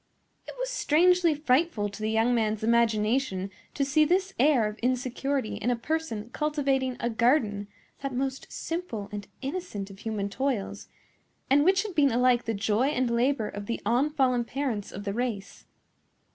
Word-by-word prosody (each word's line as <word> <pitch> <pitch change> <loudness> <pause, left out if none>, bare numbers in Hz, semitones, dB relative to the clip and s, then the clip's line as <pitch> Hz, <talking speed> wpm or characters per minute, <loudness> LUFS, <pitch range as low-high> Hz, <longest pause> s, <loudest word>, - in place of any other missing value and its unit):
It - - -8
was - - -3
strangely 360 -5 +3
frightful 280 -5 +1
to 200 +1 -9
the 215 - 0
young 225 +2 +2
man's 220 -2 0
imagination 220 -3 +1 0.2
to 280 - +1
see 300 +3 +4
this 375 +5 +1
air 265 -4 +4
of 210 +1 -7
insecurity 255 0 -1
in 245 - -1
a 245 - +2
person 240 -4 -3
cultivating 275 -4 0
a 235 - -1
garden, 225 -3 +1 0.3
that 275 -1 -3
most 265 +1 -3
simple 325 - -4
and 205 -1 -6 0.2
innocent 270 - -4
of 195 - -13
human 215 -2 -3
toils, 245 -1 -3 0.6
and 285 +1 +6
which 380 +4 +4
had 425 -3 -6
been 290 -4 +4
alike 245 0 +3
the 225 - -1
joy 210 +5 +1
and 255 -4 0
labor 235 -1 +1
of 205 0 -7
the 235 - -2
unfallen 255 +1 +2
parents 240 -5 -3
of 200 - -7
the 200 -1 -3
race. 225 -4 -4
250 Hz, 165 wpm, -27 LUFS, 215-290 Hz, 0.6 s, and